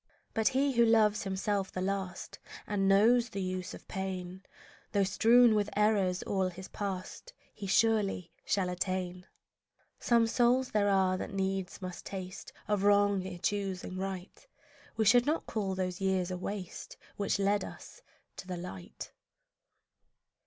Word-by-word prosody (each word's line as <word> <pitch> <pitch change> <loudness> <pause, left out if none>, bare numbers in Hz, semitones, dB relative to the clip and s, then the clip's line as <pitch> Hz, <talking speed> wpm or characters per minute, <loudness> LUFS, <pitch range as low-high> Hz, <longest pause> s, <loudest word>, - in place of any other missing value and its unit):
But 220 -1 +1
he 270 +1 +2
who 235 -2 +4
loves 220 -2 +3
himself 195 0 -1
the - - -4
last 190 -1 -3 0.3
And 195 -2 0
knows 230 +5 +5
the 200 - -5
use 185 -1 -3
of - - -14
pain, 190 -1 -5 0.5
Though 200 - +3
strewn 225 +5 +5
with 210 -1 +1
errors 200 -4 +2
all 190 -2 0
his 185 +1 -9
past, 200 - -5 0.2
He 200 - -7
surely 200 -4 +2
shall 190 -3 0
attain. 180 0 -3 0.7
Some 235 -1 +3
souls 245 +3 +2
there 205 -1 +2
are 190 -1 +3
that 195 - -6
needs 190 -1 -2
must 180 -1 -6
taste 185 -1 -7 0.2
Of 210 -2 +1
wrong, 205 -1 +3
ere 180 -2 -6
choosing 190 0 -2
right; 190 - -6 0.5
We 220 - +2
should 245 +5 +5
not 315 +2 0
call 195 -4 -2
those 185 0 -3
years 190 -2 +1
a 180 - -3
waste 190 -1 -6 0.2
Which 200 0 0
led 200 +1 +1
us - - -10 0.4
to 185 - -8
the 180 -1 -4
light. 95 - -8
195 Hz, 150 wpm, -31 LUFS, 185-210 Hz, 0.7 s, knows